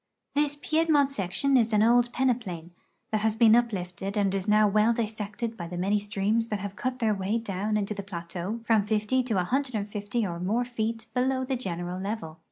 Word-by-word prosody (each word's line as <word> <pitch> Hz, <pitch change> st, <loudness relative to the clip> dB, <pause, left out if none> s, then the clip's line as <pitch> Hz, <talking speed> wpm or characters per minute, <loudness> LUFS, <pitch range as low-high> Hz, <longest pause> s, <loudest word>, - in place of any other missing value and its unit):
This 290 Hz, 0 st, +1 dB
Piedmont 310 Hz, -2 st, +2 dB
section 240 Hz, +5 st, 0 dB
is 230 Hz, -3 st, +3 dB
an 210 Hz, 0 st, +4 dB
old 240 Hz, +1 st, +4 dB
peneplain 225 Hz, -11 st, -1 dB, 0.4 s
that 215 Hz, -1 st, +1 dB
has 220 Hz, 0 st, +1 dB
been 225 Hz, -1 st, +6 dB
up 240 Hz, -1 st, +3 dB
lifted 190 Hz, +1 st, -4 dB
and 200 Hz, -2 st, +2 dB
is 195 Hz, 0 st, -2 dB
now 210 Hz, 0 st, +5 dB
well 215 Hz, +3 st, +3 dB
dissected 220 Hz, 0 st, -3 dB
by 170 Hz, -5 st, -6 dB
the 175 Hz, +1 st, -6 dB
many 200 Hz, +4 st, +1 dB
streams 205 Hz, +3 st, 0 dB
that 210 Hz, -, -2 dB
have 200 Hz, 0 st, -6 dB
cut 255 Hz, +2 st, -2 dB
their 225 Hz, -3 st, +1 dB
way 200 Hz, +3 st, -1 dB
down 210 Hz, -1 st, -2 dB
into 210 Hz, 0 st, -1 dB
the 200 Hz, -, -5 dB
plateau 185 Hz, +3 st, -5 dB
from 220 Hz, -3 st, +2 dB
fifty 215 Hz, +4 st, +1 dB
to 235 Hz, -5 st, -1 dB
a -, -, +2 dB
hundred 260 Hz, +5 st, -1 dB
and 205 Hz, -1 st, -3 dB
fifty 205 Hz, +2 st, -2 dB
or 170 Hz, -3 st, -4 dB
more 220 Hz, +7 st, 0 dB
feet 230 Hz, -1 st, -3 dB
below 260 Hz, +1 st, +1 dB
the 265 Hz, 0 st, -1 dB
general 180 Hz, -5 st, -4 dB
level. 195 Hz, -6 st, -5 dB
215 Hz, 210 wpm, -27 LUFS, 195-240 Hz, 0.4 s, been